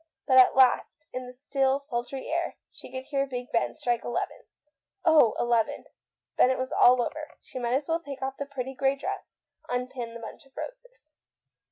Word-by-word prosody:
But 260 Hz, -2 st, +6 dB
at 255 Hz, -, +7 dB
last, 255 Hz, -5 st, +3 dB
in 255 Hz, 0 st, -4 dB
the 250 Hz, -, -10 dB
still, 270 Hz, 0 st, +1 dB
sultry 265 Hz, -1 st, -4 dB
air, -, -, -1 dB, 0.2 s
she -, -, -13 dB
could 260 Hz, 0 st, -5 dB
hear 275 Hz, -2 st, 0 dB
Big 250 Hz, -1 st, -6 dB
Ben 230 Hz, -, +1 dB
strike 240 Hz, -1 st, -1 dB
eleven. 240 Hz, -, -3 dB, 0.6 s
Oh, 310 Hz, -9 st, +6 dB
eleven! 235 Hz, -2 st, +1 dB, 0.5 s
Then -, -, +7 dB
it 260 Hz, -, +1 dB
was 260 Hz, 0 st, -3 dB
all 245 Hz, 0 st, +6 dB
over. 305 Hz, +4 st, -6 dB
She 255 Hz, -, -7 dB
might 240 Hz, 0 st, 0 dB
as 275 Hz, +1 st, -1 dB
well 330 Hz, 0 st, +1 dB
take 280 Hz, -5 st, -7 dB
of 265 Hz, 0 st, -1 dB
the 280 Hz, -, -3 dB
pretty 265 Hz, -2 st, -5 dB
grey 270 Hz, +1 st, +1 dB
dress, 275 Hz, -, -6 dB, 0.3 s
unpin 245 Hz, -1 st, -3 dB
the -, -, -6 dB
bunch 230 Hz, +6 st, -9 dB
of 270 Hz, -, -30 dB
roses. -, -, -9 dB
260 Hz, 190 wpm, -28 LUFS, 245-280 Hz, 0.6 s, at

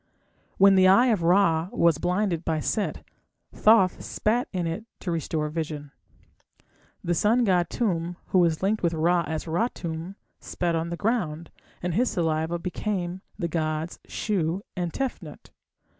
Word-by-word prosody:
When 195 Hz, 0 st, +7 dB
the 185 Hz, -1 st, +6 dB
Eye 235 Hz, +7 st, +6 dB
of 200 Hz, -, -1 dB
Ra 170 Hz, -1 st, +3 dB
was 170 Hz, -3 st, +3 dB
blinded 180 Hz, -1 st, 0 dB
by 160 Hz, -1 st, 0 dB
Set, 205 Hz, +6 st, -2 dB, 0.5 s
Thoth 210 Hz, -4 st, +4 dB
spat 235 Hz, +4 st, 0 dB
in 180 Hz, -3 st, -2 dB
it 165 Hz, +6 st, -3 dB, 0.2 s
to 180 Hz, -, -3 dB
restore 160 Hz, -1 st, -2 dB
vision. 150 Hz, -2 st, -5 dB, 1.1 s
The 175 Hz, -, 0 dB
sun 225 Hz, +8 st, +3 dB
god 180 Hz, -5 st, +2 dB
Tum, 175 Hz, -6 st, -1 dB
who 185 Hz, -, +3 dB
was 170 Hz, -1 st, +2 dB
linked 210 Hz, +3 st, +1 dB
with 170 Hz, -1 st, +1 dB
Ra 170 Hz, +2 st, +2 dB
as 160 Hz, +1 st, -4 dB
Ra 170 Hz, +9 st, +1 dB
Tum, 170 Hz, +2 st, -6 dB, 0.2 s
spat 175 Hz, -2 st, -2 dB
on 165 Hz, +1 st, -2 dB
the 170 Hz, -, -4 dB
ground, 175 Hz, -8 st, -2 dB, 0.3 s
and 180 Hz, -1 st, -1 dB
his 240 Hz, +7 st, +2 dB
saliva 160 Hz, 0 st, -1 dB
became 180 Hz, 0 st, -3 dB, 0.2 s
the 175 Hz, -5 st, -2 dB
gods 155 Hz, 0 st, -2 dB
Shu 190 Hz, -2 st, -1 dB
and 175 Hz, -2 st, -2 dB
Tefnut. 270 Hz, +4 st, -5 dB
175 Hz, 155 wpm, -26 LUFS, 165-195 Hz, 1.1 s, When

